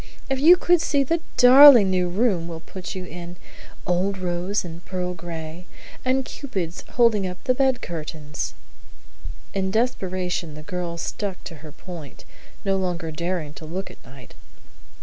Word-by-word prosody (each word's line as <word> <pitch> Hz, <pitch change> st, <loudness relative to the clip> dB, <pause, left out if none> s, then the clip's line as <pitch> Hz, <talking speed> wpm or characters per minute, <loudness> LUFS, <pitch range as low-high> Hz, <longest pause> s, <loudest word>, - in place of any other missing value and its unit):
If 265 Hz, -, 0 dB
you 335 Hz, +6 st, +8 dB
could 350 Hz, -1 st, +3 dB
see 285 Hz, -4 st, +2 dB
the 330 Hz, +5 st, 0 dB, 0.2 s
darling 250 Hz, -5 st, +9 dB
new 180 Hz, -1 st, +1 dB
room 185 Hz, -3 st, +1 dB
we'll 165 Hz, -1 st, -7 dB
put 185 Hz, +3 st, -8 dB
you 185 Hz, -1 st, -5 dB
in: 175 Hz, 0 st, -8 dB, 0.5 s
old 185 Hz, +3 st, 0 dB
rose 180 Hz, +2 st, -2 dB
and 170 Hz, 0 st, -9 dB
pearl 180 Hz, -1 st, -3 dB
gray, 165 Hz, 0 st, -8 dB, 0.4 s
and 260 Hz, +1 st, +1 dB
Cupids 190 Hz, -, -5 dB
holding 225 Hz, -5 st, +3 dB
up 180 Hz, 0 st, -8 dB
the 255 Hz, -, +2 dB
bed 265 Hz, -1 st, +1 dB
curtains!" 155 Hz, -3 st, -5 dB, 1.0 s
In 190 Hz, -1 st, -1 dB
desperation 185 Hz, -7 st, -1 dB
the 155 Hz, -, -9 dB
girl 175 Hz, 0 st, -4 dB
stuck 195 Hz, +2 st, -4 dB
to 165 Hz, -, -8 dB
her 155 Hz, +1 st, -11 dB
point, 165 Hz, -4 st, -10 dB, 0.4 s
no 195 Hz, 0 st, +2 dB
longer 175 Hz, -3 st, -2 dB
daring 170 Hz, -1 st, -3 dB
to 155 Hz, -, -10 dB
look 185 Hz, +5 st, -5 dB
at -, -, -18 dB
Knight. 130 Hz, -1 st, -14 dB
180 Hz, 155 wpm, -23 LUFS, 170-215 Hz, 1.0 s, darling